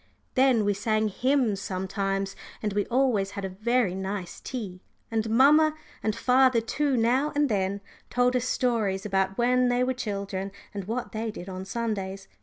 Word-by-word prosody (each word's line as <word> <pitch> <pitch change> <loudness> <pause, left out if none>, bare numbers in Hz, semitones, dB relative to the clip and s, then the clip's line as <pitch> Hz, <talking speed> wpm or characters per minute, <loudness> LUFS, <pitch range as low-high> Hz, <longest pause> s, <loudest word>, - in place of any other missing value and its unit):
Then 255 -5 +4
we 205 - +2
sang 215 +1 0
hymns 245 -2 +1
sometimes, 195 +1 -2 0.3
and 210 -2 -1
we 205 0 0
always 240 -6 +2
had 200 - -3
a - - -3
very 220 +1 +1
nice 190 -1 -4
tea, 200 -8 -6 0.3
and 225 -1 0
mamma, 300 +6 +5 0.3
and 215 -1 0
father 255 -1 +4
too 270 +4 0
now 250 +6 +2
and 290 -1 +2
then, 200 -1 0 0.3
told 245 +1 +2
us 250 -1 +1
stories 220 -7 0
about 195 -1 0
when 250 +1 +3
they 245 +1 +2
were 260 +1 +1
children 200 -5 -4 0.2
and 200 -2 -5
what 235 +4 -3
they 220 +1 -3
did 190 -4 -8
on 185 0 -6
Sundays. 195 -3 -3
220 Hz, 170 wpm, -27 LUFS, 195-250 Hz, 0.3 s, mamma